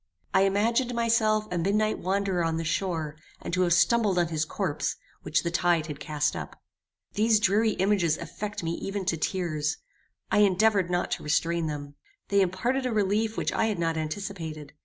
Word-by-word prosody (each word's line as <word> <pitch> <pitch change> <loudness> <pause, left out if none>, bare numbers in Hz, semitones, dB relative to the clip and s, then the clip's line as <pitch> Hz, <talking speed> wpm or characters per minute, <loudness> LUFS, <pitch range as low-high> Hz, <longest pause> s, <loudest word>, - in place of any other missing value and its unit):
I 190 0 +5
imagined 230 +5 +1
myself 220 -2 +2
a 175 - -1
midnight 210 +5 +1
wanderer 190 -1 0
on 165 0 0
the 165 - -2
shore, 160 -3 -2 0.2
and - - -6
to 185 - +2
have 175 -1 +3
stumbled 210 0 +3
on 175 -2 +2
his 160 -1 -1
corpse, - - -2 0.3
which - - 0
the 170 - -1
tide 175 -2 +2
had 150 -2 -7
cast 150 -1 -1
up. - - -7 0.5
These 220 0 +3
dreary 215 +2 +3
images 185 -5 +2
affected 205 +3 -6
me 165 - 0
even 195 -1 -4
to 180 - +1
tears. 155 -3 -1 0.5
I - - +4
endeavoured 200 -1 +3
not 175 0 -1
to - - -2
restrain 165 +2 0
them. 145 -1 -5 0.4
They 200 0 +4
imparted 240 +9 0
a - - -2
relief 215 +1 0
which - - 0
I - - +1
had 215 - -1
not 165 -1 0
anticipated. 160 -2 -5
185 Hz, 180 wpm, -27 LUFS, 165-210 Hz, 0.5 s, I